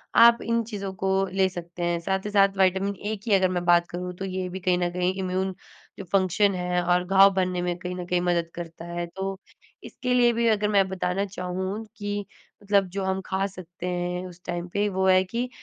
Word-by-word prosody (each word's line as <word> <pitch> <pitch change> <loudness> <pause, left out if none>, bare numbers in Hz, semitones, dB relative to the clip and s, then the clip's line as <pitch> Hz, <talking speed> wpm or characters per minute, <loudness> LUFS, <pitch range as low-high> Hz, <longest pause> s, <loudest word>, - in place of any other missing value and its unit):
आप 235 0 +7
इन 230 0 +1
चीज़ों 200 -3 -5
को 190 +1 -2 0.2
ले 190 -1 +3
सकते 175 -1 -7
हैं। 170 0 0
साथ 190 +3 -2
ही - - -2
साथ 195 -1 +4
विटामिन-ए 195 +3 +1
की 215 - +1
अगर 190 -1 +4
मैं 175 -1 -1
बात 175 0 +4
करूँ 180 +1 -5
तो 195 - -4
ये 185 -1 -3
भी 190 +1 -6
कहीं 180 -1 +2
न 175 -1 0
कहीं 180 +1 0
इम्यून 185 0 -1 0.4
जो - - -5
फंक्शन 195 +1 +3
है 180 0 0
और 180 +1 +2
घाव 195 +1 +6
भरने 185 -1 0
में 175 0 -1
कहीं 180 0 -5
न 180 -1 -5
कहीं 180 0 0
मदद 170 -2 0
करता 170 -1 -7
है 175 0 -4
तो 195 0 -3 0.5
इसके 250 -1 -3
लिए 240 -1 +4
भी 235 0 +1
अगर 210 -2 +2
मैं 195 -2 +3
बताना 190 +1 -1
चाहूँ 190 +3 -4
कि 205 -1 -3 0.4
मतलब 200 -1 +3
जो 195 - 0
हम 190 0 -1
खा 190 +1 -1
सकते 180 -2 -8
हैं 180 0 -2
उस 180 0 -13
टाइम 175 0 -3
पे 205 +1 +1
वो 190 0 0
है 185 0 +5
कि 235 +6 -3
190 Hz, 220 wpm, -25 LUFS, 180-195 Hz, 0.5 s, आप